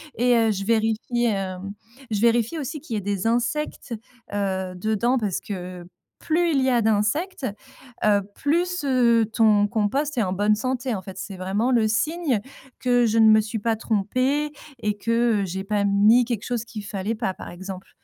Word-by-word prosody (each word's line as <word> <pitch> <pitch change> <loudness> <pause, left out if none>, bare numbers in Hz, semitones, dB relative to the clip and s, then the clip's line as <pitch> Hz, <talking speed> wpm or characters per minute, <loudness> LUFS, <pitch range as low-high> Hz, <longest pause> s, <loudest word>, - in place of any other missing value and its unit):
Et 245 +1 +3
heu, 225 -1 +3
je 195 -1 -3
vérifie, 225 +2 0
hem, 195 -2 -2 0.4
je 210 -2 -1
vérifie 235 +5 +2
aussi 300 0 -4
qu'il 270 -5 -8
y - - 0
ait - - -2
des 200 +1 -2
insectes, 245 +3 -1 0.4
heu, 190 -2 -2
dedans 220 +6 +1
parce 205 -6 -1
que 180 -3 -6 0.4
plus 340 +2 +1
il 275 -3 +2
y 260 - +2
a 240 -1 +3
d'insectes, 225 - 0 0.6
heu, 205 -1 +4
plus, 350 +3 0
heu, 235 -4 +4
ton 215 -2 +4
compost 255 +8 -1
est 230 - +3
en 185 -2 -1
bonne 205 +2 +2
santé, 255 +2 -2
en 190 - -5
fait. 190 0 -9
C'est 190 0 -6
vraiment 195 +6 0
le 230 -3 +3
signe 280 +4 0 0.4
que 245 -1 +3
je 225 0 +2
ne 220 - +7
me 215 0 +7
suis 220 +1 -4
pas 225 +2 0
trompée 255 +8 0 0.3
et 210 -1 -1
que, 230 0 +1
heu, - - -1
j'ai 190 +1 -4
pas 205 0 0
mis 210 +5 +5
quelque 230 -4 -3
chose 240 -2 -2
qu'il 215 -2 -8
fallait 200 +2 -3
pas, 215 -4 -2
par - - -9
exemple. 190 +1 -8
220 Hz, 190 wpm, -24 LUFS, 200-245 Hz, 0.6 s, ne